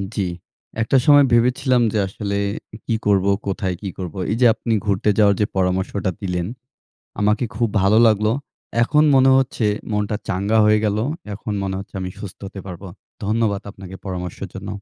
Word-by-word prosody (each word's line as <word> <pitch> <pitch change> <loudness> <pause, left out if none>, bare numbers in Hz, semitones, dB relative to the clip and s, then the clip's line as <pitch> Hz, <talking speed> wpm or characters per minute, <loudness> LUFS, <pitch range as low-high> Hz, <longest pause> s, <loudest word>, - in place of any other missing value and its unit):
জি, 100 - 0 0.6
একটা 115 +4 +3
সময় 145 -1 +7
ভেবেছিলাম 125 +1 +3
যে 110 - +1
আসলে 100 +1 -4 0.5
কী 115 - 0
করব? 100 -2 +3 0.2
কোথায় 95 -1 -2
কী 100 - -4
করব? 90 -4 -6 0.2
এই 110 - +1
যে - - +6
আপনি 115 0 -2
ঘুরতে 100 +1 +1
যাওয়ার 100 -2 +5
যে - - +4
পরামর্শটা 95 +1 0
দিলেন, 90 -2 -2 0.7
আমাকে 105 +4 +2
খুব 120 -1 +1
ভালো 100 +3 +4
লাগলো 105 -1 +3 0.5
এখন 150 +5 +3
মনে 135 0 +6
হচ্ছে 130 -3 0 0.3
মনটা 105 0 -1
চাঙ্গা 100 +4 +1
হয়ে 105 0 +4
গেলো। 105 +1 0 0.3
এখন 105 +1 -5
মনে 95 -1 -2
হচ্ছে 100 +2 -10
আমি 90 0 -4
সুস্থ 100 -4 -8
হতে 95 0 -8
পারব, 90 -1 -8 0.4
ধন্যবাদ 105 -1 0
আপনাকে 95 -2 -11
পরামর্শের 90 0 -5
জন্য। 95 +1 -7
100 Hz, 165 wpm, -21 LUFS, 95-110 Hz, 0.7 s, সময়